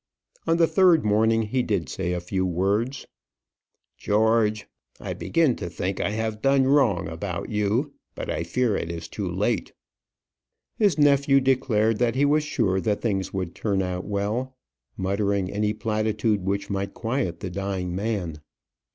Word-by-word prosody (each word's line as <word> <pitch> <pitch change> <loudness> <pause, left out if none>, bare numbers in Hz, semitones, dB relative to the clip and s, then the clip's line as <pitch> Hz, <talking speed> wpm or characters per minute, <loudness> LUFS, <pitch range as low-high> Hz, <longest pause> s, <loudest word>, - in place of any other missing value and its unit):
On 165 - +3
the 170 - +5
third 175 - +4
morning, 110 +2 +3
he 125 +4 0
did 100 - -1
say 90 -2 -3
a 90 - -1
few 95 +2 -2
words: 100 +9 0 0.9
"George, 110 0 +2 0.3
I - - -4
begin 160 -7 +1
to 90 - -5
think 90 +3 -3
I - - 0
have 110 0 -3
done 135 +1 +4
wrong 120 - +3
about 85 +2 -5
you; 110 +7 0 0.2
but - - -5
I - - -2
fear 110 +6 0
it 85 - -3
is 85 -1 -5
too - - -4
late." - - -1 1.0
His 205 -6 +2
nephew 140 -2 +4
declared 115 -5 +2
that 120 -1 +1
he 140 +2 +3
was 150 +1 +3
sure 105 -10 0
that 105 0 0
things 95 -5 -1
would 95 -3 -3
turn 100 -3 -1
out 90 0 -3
well, 110 +6 -2 0.4
muttering 100 0 0
any 105 +1 0
platitude 110 -1 0
which 100 +1 -1
might 100 0 -3
quiet 115 -7 -2
the 95 - -4
dying 95 -1 -3
man. 95 -6 -2
105 Hz, 160 wpm, -25 LUFS, 95-125 Hz, 1.0 s, the